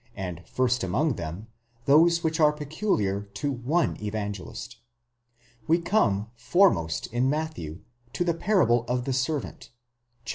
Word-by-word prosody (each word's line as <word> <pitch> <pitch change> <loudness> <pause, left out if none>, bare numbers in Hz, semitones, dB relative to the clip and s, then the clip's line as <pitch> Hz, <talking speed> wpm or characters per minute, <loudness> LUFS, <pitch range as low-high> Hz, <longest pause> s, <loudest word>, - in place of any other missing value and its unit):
and 90 -4 -5
first 125 -2 0
among 135 - +1
them, 85 +2 -6 0.4
those 170 +4 +5
which 160 0 0
are 150 -1 +6
peculiar 150 - -1
to 145 +7 -1
one 140 +7 0
Evangelist. 105 -3 -5 0.9
We 165 +1 +4
come 110 - +1
foremost 120 - +2
in 125 +2 +2
Matthew 150 - -3 0.3
to 160 - 0
the 170 -1 +1
parable 160 - +2
of 125 +1 -1
the 135 - -1
servant 135 +3 -2 0.6
(xvili. - - -7
130 Hz, 135 wpm, -26 LUFS, 105-160 Hz, 0.9 s, are